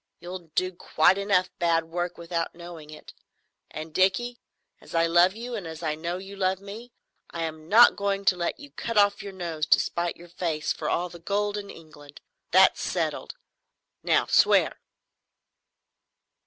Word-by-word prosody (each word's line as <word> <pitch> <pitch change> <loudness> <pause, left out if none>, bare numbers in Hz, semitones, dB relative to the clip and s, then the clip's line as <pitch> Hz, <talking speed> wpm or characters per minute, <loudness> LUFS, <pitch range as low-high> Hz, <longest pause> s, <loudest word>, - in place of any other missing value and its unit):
You'll 175 0 -8
do 185 0 +1
quite 180 +1 +2
enough 195 -2 +1
bad 165 -2 +2
work 175 +1 -4
without 170 0 -3
knowing 170 -3 -10
it. 155 0 -12 0.6
And, 155 0 -8
Dickie, 240 +7 +1 0.4
as - - -11
I 165 0 +4
love 175 +3 +4
you 240 +2 -7
and 200 -7 -5
as 160 +1 -8
I 155 -1 0
know 170 +3 -4
you 195 +1 -9
love 190 -1 0
me, 210 +5 -10 0.4
I 170 - -4
am 160 0 -6
not 235 +3 +7
going 200 0 -2
to 190 - +4
let 170 -1 -3
you 285 0 -12
cut 230 -1 -4
off 205 0 +4
your 200 - -7
nose 170 -4 -4
to - - +5
spite 170 0 -2
your 175 0 -14
face 165 -3 -2
for - - -4
all 180 +1 -1
the 170 - -12
gold 205 +4 -1
in 205 -1 -6
England. 145 -4 -14 0.3
That's - - +5
settled. - - -3 0.7
Now - - +2
swear." - - +3
175 Hz, 170 wpm, -26 LUFS, 165-200 Hz, 0.7 s, not